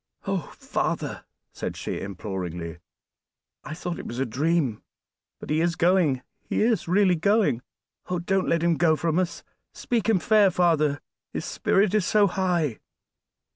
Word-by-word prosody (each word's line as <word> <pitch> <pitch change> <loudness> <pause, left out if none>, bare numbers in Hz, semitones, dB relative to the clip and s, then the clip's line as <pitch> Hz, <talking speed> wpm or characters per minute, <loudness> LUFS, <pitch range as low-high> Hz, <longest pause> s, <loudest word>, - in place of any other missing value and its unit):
"Oh! - - -2
father," - - -2 0.3
said - - -5
she - - -4
imploringly, 90 -4 -5 0.8
"I 155 - -6
thought 175 0 -4
it - - -7
was 120 - -6
a 135 - 0
dream, 140 -1 0 0.6
but - - -7
he 155 +1 +2
is 170 0 +1
going, 170 -7 +2 0.2
he - - -1
is 225 -6 +1
really 185 +1 +4
going. 195 - +2 0.5
Oh! 180 - 0
don't 190 +2 0
let 170 0 +1
him 170 -2 +2
go 160 -2 +4
from 165 +2 0
us; 180 -2 -2 0.3
speak 230 -2 -1
him 220 - +5
fair, 210 +2 +4
father, 160 -5 +2 0.3
his - - -3
spirit 195 0 +1
is 215 -2 +3
so 210 -1 +4
high!" 175 - 0
170 Hz, 155 wpm, -25 LUFS, 145-190 Hz, 0.8 s, him